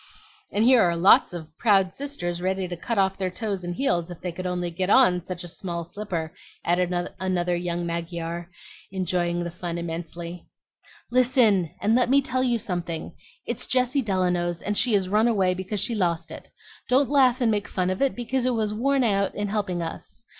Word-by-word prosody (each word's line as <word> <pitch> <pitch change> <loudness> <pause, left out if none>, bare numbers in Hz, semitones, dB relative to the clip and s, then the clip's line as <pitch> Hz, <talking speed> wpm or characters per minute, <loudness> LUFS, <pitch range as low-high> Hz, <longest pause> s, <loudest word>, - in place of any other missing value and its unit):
"And 210 - +1
here 250 -1 +6
are 170 -3 +3
lots 170 +3 +5
of 160 -3 -8
proud 195 -4 +3
sisters 175 -12 -4
ready 190 0 -1
to 175 - -5
cut 225 +6 -3
off 195 -1 +2
their 185 -1 -1
toes 195 0 -3
and 175 0 -4
heels 175 -10 0
if 175 - -8
they 180 - -4
could 185 +2 -5
only 180 -1 -2
get 185 +3 -2
on 195 -7 +5
such 180 0 -6
a - - -6
small 170 0 -4
slipper," 170 -4 -5 0.3
added 175 +1 +1 0.3
another 180 -2 0
young 175 0 -2
Mygar, 170 0 -4 0.4
enjoying 175 -2 -1
the 170 - -4
fun 170 0 -5
immensely. 170 +1 -6 0.6
"Listen, 240 - +4
and 215 - +2
let 245 0 +3
me 275 +2 +6
tell 255 -1 -1
you 245 -2 +2
something. 175 -5 -4 0.3
It's - - -3
Jessie 255 +2 +2
Delano's, 180 -5 0
and 205 - -1
she 240 +2 +3
has 195 -2 +2
run 210 +4 +3
away 195 -6 +2
because 190 +3 -4
she 235 - -1
lost 175 -6 -1
it. - - -10 0.4
Don't 265 +2 +4
laugh 260 -3 +4
and 235 -3 +2
make 205 -1 -1
fun 185 -1 -1
of 185 - -3
it, 275 -1 +2
because 250 +1 -1
it 250 - +1
was 215 -2 -1
worn 270 +4 +1
out 200 -3 +1
in 205 0 -2
helping 195 -5 -1
us. 165 +7 -8
185 Hz, 195 wpm, -25 LUFS, 175-225 Hz, 0.6 s, here